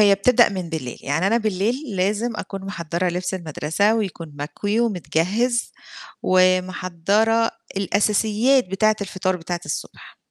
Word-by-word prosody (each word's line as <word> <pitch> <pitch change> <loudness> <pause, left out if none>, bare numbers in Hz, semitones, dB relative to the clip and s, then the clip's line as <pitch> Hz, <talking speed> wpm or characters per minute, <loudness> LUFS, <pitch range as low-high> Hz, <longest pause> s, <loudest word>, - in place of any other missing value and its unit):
هي 205 -1 +7
بتبدأ 240 +4 +4
من 185 -3 -5
بالليل، 155 -7 -5
يعني 160 +7 0
أنا 225 - +3
بالليل 220 +3 -1
لازم 210 +5 0
أكون 195 -2 -6
محضّرة 175 -2 -2
لبس 180 +2 -2
المدرسة 170 +4 0
ويكون 175 -7 -4
مكوي 205 +10 -2
ومتجهِّز، 215 - 0 0.5
ومحضّرة 185 +4 +2 0.3
الأساسيات 210 +5 +2
بتاعة 215 +3 +2
الفطار 185 -1 -1
بتاعة 175 0 -4
الصبح. - - -7
195 Hz, 120 wpm, -22 LUFS, 180-215 Hz, 0.5 s, هي